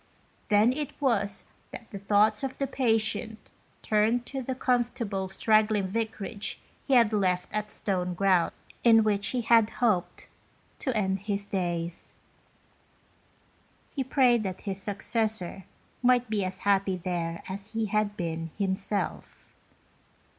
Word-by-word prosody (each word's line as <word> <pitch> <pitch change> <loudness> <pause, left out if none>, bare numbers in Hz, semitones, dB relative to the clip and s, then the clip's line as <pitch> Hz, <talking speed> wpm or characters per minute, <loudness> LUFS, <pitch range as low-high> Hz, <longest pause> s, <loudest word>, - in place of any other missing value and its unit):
Then 210 +4 +4
it 295 0 -5
was 210 -8 0 0.2
that 235 - -10
the 200 - -6
thoughts 210 +3 +3
of 265 -1 -3
the 275 - 0
patient 225 -4 -1 0.3
turned 220 +3 +2
to 270 +1 -5
the 260 +1 -3
comfortable 240 -6 -1
straggling 215 0 +2
vicarage 220 0 -3 0.3
he 275 - +4
had 230 -3 +5
left 185 -3 0
at 210 0 -1
Stoneground, 180 -2 +1 0.3
in 225 -2 +7
which 205 -2 +1
he 250 - 0
had 225 -1 +4
hoped 215 -9 0 0.5
to 260 -5 -1
end 190 -2 0
his 200 0 -3
days. 175 -3 -2 1.8
He 270 - -1
prayed 255 -3 +3
that 190 -3 -4
his 195 -1 -4
suc 200 -1 -4
cessor 215 -5 -1 0.4
might 245 -2 +3
be 205 -2 +1
as 185 0 -5
happy 195 -2 +2
there 170 -2 -3
as 200 +3 -7
he 225 0 0
had 210 0 0
been 165 -2 -3
himself. 195 +1 -2
210 Hz, 130 wpm, -28 LUFS, 190-230 Hz, 1.8 s, in